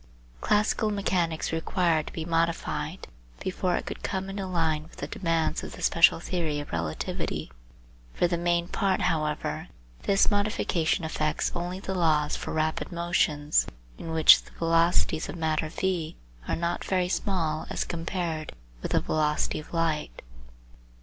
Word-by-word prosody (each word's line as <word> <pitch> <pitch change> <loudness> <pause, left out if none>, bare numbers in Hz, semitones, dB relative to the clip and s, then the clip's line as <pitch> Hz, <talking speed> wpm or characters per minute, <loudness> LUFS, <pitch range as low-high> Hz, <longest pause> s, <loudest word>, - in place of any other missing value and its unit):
Classical 215 +1 +2
mechanics 180 -5 0
required 165 -1 +1
to - - -8
be 160 - -4
modified 165 0 -1 0.3
before 185 -1 -1
it - - -2
could - - -6
come 190 0 -3
into 195 -1 -4
line 165 -4 +1
with 160 - -15
the - - -5
demands 165 0 0
of - - -7
the - - -8
special 170 -1 +5
theory 165 -4 -2
of 145 - -7
relativity. 80 -2 -3 0.6
For 175 - +3
the 175 - 0
main 170 0 +1
part, 195 0 +1
however, 150 - -1 0.3
this 195 +1 +3
modification 200 -5 +1
affects 155 -1 -1
only 175 +2 -3
the 190 -1 -4
laws 155 -4 +2
for - - -5
rapid 155 +2 -1
motions, 165 -4 +1 0.3
in 165 - -6
which 160 -1 +7
the - - -17
velocities 165 -1 +2
of - - -5
matter 160 -1 0
v 170 -2 -2 0.3
are - - +1
not 170 +1 -1
very 185 -2 +1
small 170 -5 -1
as - - -1
compared 165 -2 -3 0.3
with - - -3
the - - +4
velocity 150 -1 0
of 155 - -11
light. 160 - -1
165 Hz, 150 wpm, -27 LUFS, 155-180 Hz, 0.6 s, which